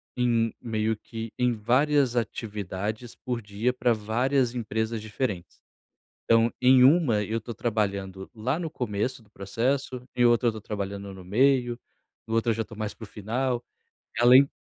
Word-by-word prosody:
em 115 -2 +1
meio 110 -1 -1
que 115 +1 -8
em 125 0 +2
várias 130 +4 +2
atividades 105 0 -3
por 125 -2 -4
dia 105 +4 -1
pra 125 -1 +1
várias 125 +4 0
empresas 110 -1 -2
diferentes. 105 -4 -4 0.7
Então, 115 0 +4
em 125 0 +6
uma 130 -6 +5
eu 110 +3 -2
tô 115 +2 -7
trabalhando 100 -4 -2
lá 125 +7 -1
no 165 -2 -4
começo 120 -1 -3
do 105 - -25
processo, 125 +6 -2
em 120 - +3
outra 120 0 +4
eu 115 - +1
tô 110 - -8
trabalhando 100 -1 -5
no 95 -1 -11
meio, 120 +3 +2 0.5
outra 115 +1 +1
já 115 +1 -2
tô 110 - -12
mais 110 -1 -4
para - - -18
o - - -9
final, 120 +4 -2 0.6
além 125 +3 +7
115 Hz, 155 wpm, -26 LUFS, 105-125 Hz, 0.7 s, além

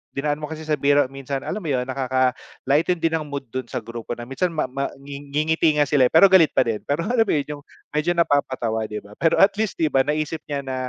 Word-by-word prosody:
dinaan 145 +1 -1
mo 150 - -5
kasi 160 0 -7
sa 155 -2 -1
biro 145 +1 +4
minsan, 135 0 -5
alam 210 - -3
mo 175 - -7
yun, 130 -4 0
nakaka-lighten 130 +5 -1
din 165 0 +2
ng 155 - -7
mood 140 -1 -5
dun 130 -1 -4
sa - - -5
grupo 115 0 -6
na 120 - -8
minsan 135 +9 -1
ma 165 -3 -2
ma 135 +2 -3
ngingiti 145 +3 -1
nga 150 - +4
sila 140 -3 +3
eh - - -10
pero 185 +4 +7
galit 180 -5 +5
pa - - +5
din 115 -3 -2
pero, 145 +4 0
alam 230 +1 +1
mo - - +1
yun, 150 0 -2
yung - - -19 0.3
medyo 150 +3 0
napapatawa 130 -9 0
di 105 0 -6
ba, 100 - -16
pero 165 - +3
at 200 +1 +6
least 220 -2 -1
di 155 -2 0
ba, 135 - +4
naisip 155 +1 -1
niya 140 -2 -3
na 130 -1 -4
145 Hz, 250 wpm, -22 LUFS, 130-160 Hz, 0.3 s, pero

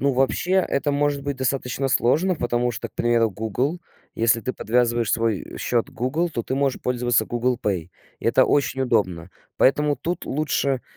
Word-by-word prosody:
Ну 140 0 +2
вообще, 135 +7 0
это 155 -6 +1
может 145 -1 0
быть 140 -1 -2
достаточно 130 0 -1
сложно, 160 +9 +2
потому 120 -2 0
что, 115 - -5
к - - -35
примеру, 115 -1 +2
Google, 125 - -2 0.3
если 115 +1 +2
ты 130 - -3
подвязываешь 120 -1 +1
свой, 115 -3 0
э, - - -10
счет 120 -2 0
к - - -16
Google, 155 +9 -1
то 115 -7 -3
ты - - -2
можешь 135 -1 0
пользоваться 120 -3 +1
Google 120 +1 0
Pay. 90 -6 -2 0.3
Это - - +4
очень 135 -2 +1
удобно. 90 -9 0 0.3
Поэтому 145 +2 +3
тут 175 +2 -4
лучше, 140 -2 -1
125 Hz, 175 wpm, -23 LUFS, 115-140 Hz, 0.3 s, Это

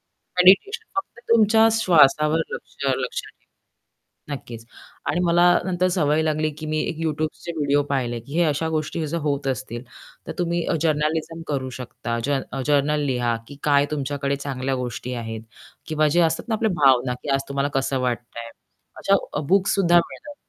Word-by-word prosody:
ना, 180 - -2
मेडिटेशन 405 - +5
फक्त 390 -10 -4
तुमच्या 225 0 +5
श्वासावर 155 -6 +4
लक्ष 485 - -8 0.2
लक्ष - - -3
ठेवा. - - -19 0.7
नक्कीच 115 -4 -10 0.4
आणि 175 - 0
मला 175 +1 +4 0.2
नंतर 185 0 +1
सवय 150 -2 +2
लागली 155 0 0
की 155 - -6
मी 155 0 0
एक 165 - -5
YouTubeचे 155 +2 -3
व्हिडिओ 145 0 +2
पाहिले 120 -4 -1
की 120 +5 -12
हे 175 - +4
अशा 155 +2 0
गोष्टी 155 +1 -2
जर 170 +3 -2
होत 140 -1 -1
असतील, 125 -2 -3 0.4
तर - - -3
तुम्ही 170 -1 0
अ, - - 0
जर्नालिझम 160 +1 0
करू 135 -3 -2
शकता. 120 -1 -4
जन 140 -1 0 0.2
जर्नल 150 +1 +2
लिहा 120 -3 0
की 140 - -11
काय 145 -1 +4
तुमच्याकडे 140 -1 -2
चांगल्या 135 -1 -3
गोष्टी 125 0 -4
आहेत 110 0 -6 0.5
किंवा 155 -1 +2
जे 175 +4 +3
असतात 165 +7 0
ना, 220 - +2
आपल्या 220 0 0
भावना 130 -1 +4
की 145 - -5
आज 135 0 +1
तुम्हाला 140 +1 -1
कसं 135 0 -1
वाटतंय 120 -1 -4 0.5
अशा 195 -6 0
बुक्स 195 +3 +3
सुद्धा 175 -3 +4
मिळतात. 290 +11 -3
150 Hz, 165 wpm, -23 LUFS, 135-170 Hz, 0.7 s, मेडिटेशन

